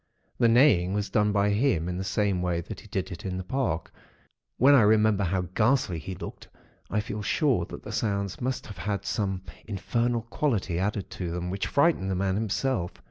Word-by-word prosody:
The 120 Hz, -, +5 dB
neighing 115 Hz, -7 st, +4 dB
was 105 Hz, 0 st, -2 dB
done 105 Hz, -2 st, +3 dB
by 100 Hz, 0 st, +2 dB
him, 100 Hz, -, +1 dB
in 90 Hz, 0 st, -3 dB
the -, -, -2 dB
same 100 Hz, -1 st, 0 dB
way 90 Hz, -1 st, 0 dB
that 95 Hz, +4 st, -8 dB
he 110 Hz, -, -14 dB
did 95 Hz, -1 st, -3 dB
it 85 Hz, -, -7 dB
in 95 Hz, -1 st, -3 dB
the 95 Hz, -, -4 dB
park; 100 Hz, -6 st, -2 dB, 0.7 s
when 135 Hz, +4 st, +6 dB
I 135 Hz, -, +7 dB
remember 105 Hz, -1 st, +4 dB
how 90 Hz, +1 st, 0 dB
ghastly 110 Hz, -6 st, +2 dB
he 95 Hz, +4 st, -6 dB
looked, -, -, -8 dB, 0.4 s
I 105 Hz, -, 0 dB
feel 105 Hz, 0 st, -4 dB
sure 125 Hz, -, +1 dB
that -, -, -9 dB
the -, -, -7 dB
sounds 100 Hz, -3 st, -2 dB
must 130 Hz, +1 st, -2 dB
have 100 Hz, -3 st, -10 dB
had 100 Hz, 0 st, -2 dB
some 95 Hz, -3 st, -1 dB, 0.2 s
infernal 115 Hz, +3 st, -1 dB
quality 110 Hz, -, -1 dB
added 100 Hz, 0 st, -2 dB
to 90 Hz, -2 st, -4 dB
them, 90 Hz, +1 st, -3 dB
which 95 Hz, +1 st, -2 dB
frightened 140 Hz, -, +2 dB
the 95 Hz, -, 0 dB
man 95 Hz, +1 st, 0 dB
himself. 105 Hz, -1 st, -1 dB
100 Hz, 200 wpm, -27 LUFS, 95-115 Hz, 0.7 s, I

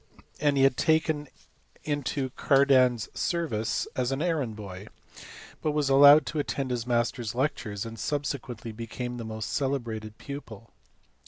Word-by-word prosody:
229 150 Hz, -, 0 dB
and 140 Hz, -, +1 dB
he 135 Hz, -, +4 dB
was 135 Hz, -, +5 dB
taken 160 Hz, -2 st, +1 dB, 0.6 s
into 145 Hz, -2 st, -2 dB
Cardan 135 Hz, -2 st, +4 dB
s 110 Hz, -4 st, -6 dB
service 145 Hz, -11 st, -1 dB
as 125 Hz, 0 st, 0 dB
an 135 Hz, -, -1 dB
errand 150 Hz, -9 st, -1 dB
boy, 100 Hz, -2 st, -8 dB, 0.7 s
but 155 Hz, -, 0 dB
was 150 Hz, -2 st, +1 dB
allowed 145 Hz, +2 st, +8 dB
to 155 Hz, -, -3 dB
attend 140 Hz, -2 st, -2 dB
his 120 Hz, -1 st, -2 dB
master 120 Hz, 0 st, 0 dB
s 115 Hz, 0 st, -4 dB
lectures, 125 Hz, -7 st, -2 dB
and 115 Hz, -1 st, -8 dB
subsequently 130 Hz, -4 st, -3 dB
became 115 Hz, +2 st, -5 dB
his 115 Hz, -, -5 dB
most 110 Hz, -1 st, -5 dB
celebrated 115 Hz, -6 st, -2 dB
pupil. 115 Hz, -6 st, -9 dB
130 Hz, 155 wpm, -27 LUFS, 115-145 Hz, 0.7 s, allowed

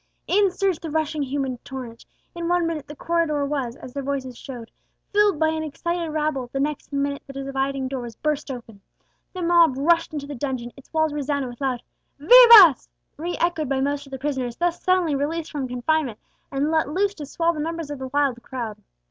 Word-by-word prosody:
In 400 Hz, +1 st, +3 dB
surged 375 Hz, -2 st, -1 dB
the 330 Hz, -, -5 dB
rushing 310 Hz, 0 st, -1 dB
human 270 Hz, -2 st, -2 dB
torrent; 245 Hz, -4 st, -9 dB, 0.3 s
in 340 Hz, 0 st, -4 dB
one 350 Hz, 0 st, +2 dB
minute 325 Hz, -3 st, -3 dB
the 295 Hz, -, -9 dB
corridor 310 Hz, -2 st, 0 dB
was, 275 Hz, -5 st, -2 dB
as 250 Hz, -, -11 dB
their 280 Hz, -, -3 dB
voices 265 Hz, -2 st, -3 dB
showed, 240 Hz, -3 st, -9 dB, 0.4 s
filled 415 Hz, -3 st, +4 dB
by 315 Hz, +1 st, +2 dB
an 315 Hz, 0 st, -2 dB
excited 335 Hz, +2 st, -3 dB
rabble; 300 Hz, -5 st, -1 dB
the 270 Hz, -, -3 dB
next 295 Hz, +1 st, -2 dB
minute 280 Hz, 0 st, -1 dB
the 275 Hz, -, -9 dB
dividing 270 Hz, 0 st, -2 dB
door 260 Hz, -1 st, -4 dB
was 235 Hz, -2 st, -8 dB
burst 300 Hz, +1 st, -2 dB
open! 230 Hz, -6 st, -8 dB, 0.5 s
The 365 Hz, -2 st, -5 dB
mob 335 Hz, -5 st, +5 dB
rushed 335 Hz, +4 st, +2 dB
into 295 Hz, -2 st, -5 dB
the 290 Hz, -, -7 dB
dungeon, 255 Hz, -2 st, -4 dB
its 275 Hz, -, -17 dB
walls 315 Hz, -1 st, +1 dB
resounded 285 Hz, -2 st, -2 dB
with 240 Hz, +3 st, -12 dB
loud 255 Hz, -3 st, -1 dB, 0.3 s
vivas, 425 Hz, -, +9 dB, 0.3 s
re 340 Hz, +4 st, -4 dB
echoed 330 Hz, -5 st, 0 dB
by 270 Hz, -1 st, 0 dB
most 285 Hz, +1 st, -1 dB
of -, -, -16 dB
the 265 Hz, -, -4 dB
prisoners 260 Hz, -3 st, -3 dB
thus 350 Hz, 0 st, 0 dB
suddenly 365 Hz, -4 st, +2 dB
released 310 Hz, +4 st, -2 dB
from 280 Hz, -4 st, -3 dB
confinement, 250 Hz, 0 st, -1 dB, 0.3 s
and 285 Hz, +3 st, 0 dB
let 315 Hz, -3 st, +1 dB
loose 390 Hz, +6 st, +1 dB
to 300 Hz, -7 st, -8 dB
swell 335 Hz, +3 st, 0 dB
the 310 Hz, -, -6 dB
numbers 325 Hz, -1 st, -4 dB
of 290 Hz, -, -5 dB
the 265 Hz, -, -5 dB
wild 270 Hz, -3 st, 0 dB
crowd. 230 Hz, -6 st, -6 dB
290 Hz, 205 wpm, -23 LUFS, 265-330 Hz, 0.5 s, vivas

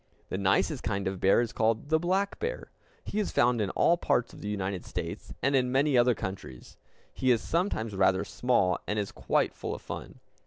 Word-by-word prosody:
The -, -, -2 dB
nicest 100 Hz, +8 st, +1 dB
kind 100 Hz, -2 st, -2 dB
of 95 Hz, -1 st, -3 dB
bear 95 Hz, +5 st, +4 dB
is 120 Hz, -, -3 dB
called 110 Hz, +5 st, 0 dB
the 160 Hz, 0 st, +3 dB
black 190 Hz, +4 st, 0 dB
bear. 475 Hz, +3 st, -4 dB, 0.3 s
He 210 Hz, -, -3 dB
is 210 Hz, -, 0 dB
found 120 Hz, -1 st, +2 dB
in 100 Hz, -, 0 dB
all 170 Hz, -, +3 dB
parts 125 Hz, -7 st, 0 dB
of -, -, -12 dB
the 105 Hz, -, -4 dB
United 95 Hz, -2 st, -3 dB
States, -, -, -6 dB
and 140 Hz, +2 st, +3 dB
in 125 Hz, -1 st, +2 dB
many 135 Hz, +2 st, +2 dB
other 120 Hz, 0 st, +4 dB
countries. 95 Hz, -, -7 dB, 0.4 s
He 130 Hz, -, 0 dB
is 120 Hz, -2 st, +5 dB
sometimes 160 Hz, -, -1 dB
rather 95 Hz, 0 st, +3 dB
small, 100 Hz, -8 st, +1 dB
and 105 Hz, -, -1 dB
is 105 Hz, -2 st, -2 dB
quite -, -, 0 dB
full -, -, -5 dB
of -, -, -10 dB
fun. -, -, -8 dB
115 Hz, 205 wpm, -29 LUFS, 100-140 Hz, 0.4 s, is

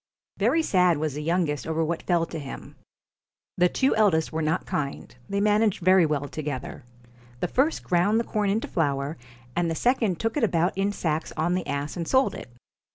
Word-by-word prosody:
Very 325 Hz, 0 st, +3 dB
sad 180 Hz, -, +3 dB
was 155 Hz, -1 st, -2 dB
the 150 Hz, -, -4 dB
youngest 160 Hz, -2 st, -1 dB
over 160 Hz, 0 st, 0 dB
what 165 Hz, +1 st, -2 dB
fell 170 Hz, -2 st, +1 dB
to 165 Hz, -, -6 dB
him. 140 Hz, -2 st, -9 dB, 0.8 s
The 180 Hz, 0 st, +4 dB
two 265 Hz, +5 st, +1 dB
eldest 180 Hz, -8 st, +2 dB
were 160 Hz, -, -1 dB
not 160 Hz, +3 st, 0 dB
kind, 140 Hz, -8 st, -4 dB
they 200 Hz, -, 0 dB
managed 210 Hz, -2 st, +2 dB
very 185 Hz, -3 st, +6 dB
well 145 Hz, -1 st, -1 dB
together. 145 Hz, -5 st, -5 dB, 0.6 s
The 180 Hz, -, -1 dB
first 275 Hz, -, +1 dB
ground 190 Hz, +5 st, +2 dB
the -, -, 0 dB
corn 210 Hz, -3 st, -1 dB
into 215 Hz, +4 st, 0 dB
flour, 140 Hz, -2 st, -1 dB, 0.4 s
and 175 Hz, -1 st, +1 dB
the 165 Hz, -, -1 dB
second 225 Hz, -5 st, +1 dB
took 225 Hz, 0 st, -1 dB
it 295 Hz, -, 0 dB
about 175 Hz, -4 st, +1 dB
in 195 Hz, +1 st, 0 dB
sacks 160 Hz, -5 st, -2 dB
on 165 Hz, +3 st, +1 dB
the 180 Hz, 0 st, -2 dB
ass 140 Hz, +1 st, -3 dB
and 170 Hz, -2 st, -3 dB
sold 265 Hz, +1 st, +3 dB
it. -, -, -9 dB
175 Hz, 195 wpm, -25 LUFS, 155-205 Hz, 0.8 s, very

